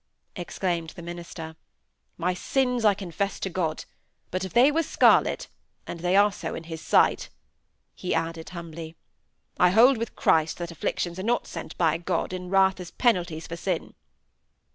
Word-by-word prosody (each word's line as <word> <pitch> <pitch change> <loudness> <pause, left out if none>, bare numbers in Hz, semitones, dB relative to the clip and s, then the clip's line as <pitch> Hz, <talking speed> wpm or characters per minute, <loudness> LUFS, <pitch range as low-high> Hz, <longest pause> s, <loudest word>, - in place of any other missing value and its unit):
exclaimed 175 -2 -2
the 170 - -9
minister. 170 -2 -7 0.6
"My 180 +1 0
sins 250 +5 0
I 210 -2 +5
confess 195 +1 -3
to 190 - -2
God. 165 -3 -2 0.5
But 185 0 -2
if 190 - -5
they 255 +5 +5
were 325 +2 +2
scarlet - - +3 0.4
(and 170 - -7
they 180 +2 +1
are 205 +1 +6
so 170 -4 -5
in 165 - -6
His 160 -1 -7
sight)," - - +3 0.6
he 180 - -2
added, 165 0 -3
humbly, 165 -2 -8 0.6
"I 180 - +6
hold 230 +6 +6
with 230 - -4
Christ 160 0 +2
that 175 -1 -5
afflictions 170 +2 -3
are - - -2
not 235 +5 0
sent - - -8
by 165 -1 +2
God 175 +1 -2
in 180 -1 -5
wrath 190 0 +3
as 180 -2 -7
penalties 175 -10 0
for 170 - -6
sin." 180 -1 -3
180 Hz, 165 wpm, -26 LUFS, 165-195 Hz, 0.6 s, are